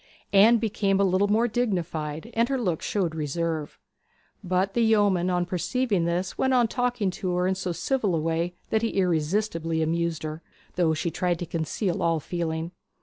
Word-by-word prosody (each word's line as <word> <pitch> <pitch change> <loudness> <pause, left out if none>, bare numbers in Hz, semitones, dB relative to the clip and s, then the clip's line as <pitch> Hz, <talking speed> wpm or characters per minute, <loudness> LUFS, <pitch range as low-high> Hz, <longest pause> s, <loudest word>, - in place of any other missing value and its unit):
Anne 215 +4 +7
became 200 -3 0
a - - +4
little 190 +1 +2
more 220 +4 +3
dignified, 175 -6 -2
and 230 +2 +2
her 270 - +1
look 180 -9 -1
showed 185 -6 -1
reserve. 160 0 -3 0.7
But 185 +1 0
the 235 - +1
yeoman 205 -5 +3
on 175 -1 +1
perceiving 190 +2 0
this 175 +2 -2
went 265 0 +2
on 240 -2 +4
talking 245 -4 0
to 180 0 -3
her 180 0 +1
in 190 - +2
so 185 -1 -3
civil 210 0 0
a - - +1
way 165 +2 -1 0.2
that 220 - +2
he 230 - 0
irresistibly 165 -1 0
amused 165 0 -1
her, 155 +1 -5 0.3
though 165 -3 +2
she 160 +2 -2
tried 180 0 0
to 175 - -4
conceal 170 +3 -2
all 165 -1 +2
feeling. 165 +1 -3
180 Hz, 180 wpm, -26 LUFS, 165-210 Hz, 0.7 s, Anne